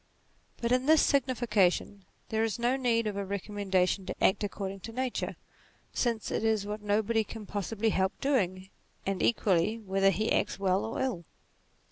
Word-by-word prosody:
But 235 0 -2
in 255 +2 +2
this 315 0 +6
signification, 215 -7 +1 0.2
there 220 0 +1
is 225 0 -1
no 240 +2 +1
need 235 -4 +1
of 210 -2 -2
a 200 - -2
recommendation 195 -1 -1
to - - -3
act 190 - +3
according 195 -1 -4
to 225 - -8
nature, 255 +1 -2 0.6
since 230 -3 -1
it - - -1
is 220 -2 +1
what 210 +1 -4
nobody 215 +2 +1
can 215 +1 -9
possibly 210 +2 -1
help 190 -1 0
doing, 190 -9 0 0.4
and 195 -1 -1
equally 210 -2 +2
whether 195 -2 +2
he 215 +3 0
acts - - +1
well 190 0 +1
or 225 - -4
ill. 235 -11 -2
210 Hz, 165 wpm, -30 LUFS, 195-230 Hz, 0.6 s, this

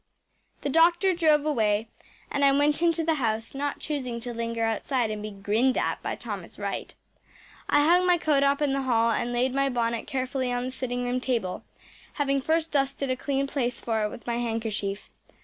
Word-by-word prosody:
The 285 - -1
doctor 345 +5 +4
drove 310 -4 +3
away, 220 -7 +1 0.4
and 280 - 0
I 275 - +6
went 290 +3 +2
into 335 -1 +2
the 325 0 +2
house, 225 -1 -1
not 285 +1 -2
choosing 255 -6 -3
to 240 0 -4
linger 230 0 -2
outside 225 +1 0
and 210 -1 -4
be 215 - -5
grinned 210 +6 +1
at - - -1
by - - -3
Thomas - - -7
Wright. - - -4 0.7
I 290 0 +4
hung 360 +2 +5
my 355 -1 +5
coat 300 -4 +2
up 280 +1 +2
in 280 -2 +1
the 275 - 0
hall 230 -3 +2
and 235 +2 -1
laid 250 +2 +1
my 275 0 +2
bonnet 235 -2 -1
carefully 260 -2 -2
on 245 0 -1
the 255 - -3
sitting 245 -1 -3
room 245 +1 0
table, 230 -8 -2 0.5
having 275 -2 0
first 320 +3 0
dusted 275 -1 0
a - - +1
clean 275 +1 -1
place 250 -3 -2
for 225 -2 -1
it 210 - 0
with 235 - -10
my 235 -1 -1
handkerchief. 225 -4 -2
255 Hz, 200 wpm, -27 LUFS, 230-285 Hz, 0.7 s, I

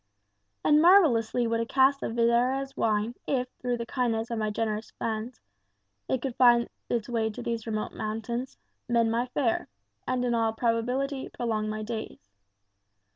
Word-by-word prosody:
And 300 0 +5
marvellously 270 - +5
would 230 0 0
a 230 - 0
cask 270 +2 +3
of - - -3
Xerez 250 +4 +2
wine, 215 +1 0
if, 255 -2 0
through 245 -1 -1
the 235 - -4
kindness 230 -2 -1
of 230 - -1
my 215 -1 0
generous 215 0 -2
friends, 225 +2 -4 0.7
it 255 - 0
could 265 -3 -3
find 240 -2 +5 0.2
its 235 -3 -1
way 230 -2 0
to 210 - -7
these 230 -1 -3
remote 215 -1 -3
mountains, 225 +4 -4 0.3
mend 230 -1 +3
my 235 +2 0
fare, 250 -2 0 0.4
and 250 -1 0
in 240 - +1
all 225 -1 +1
probability 250 +4 -1
prolong 220 -3 -2
my 215 0 -3
days. 220 - -7
235 Hz, 160 wpm, -28 LUFS, 225-250 Hz, 0.7 s, And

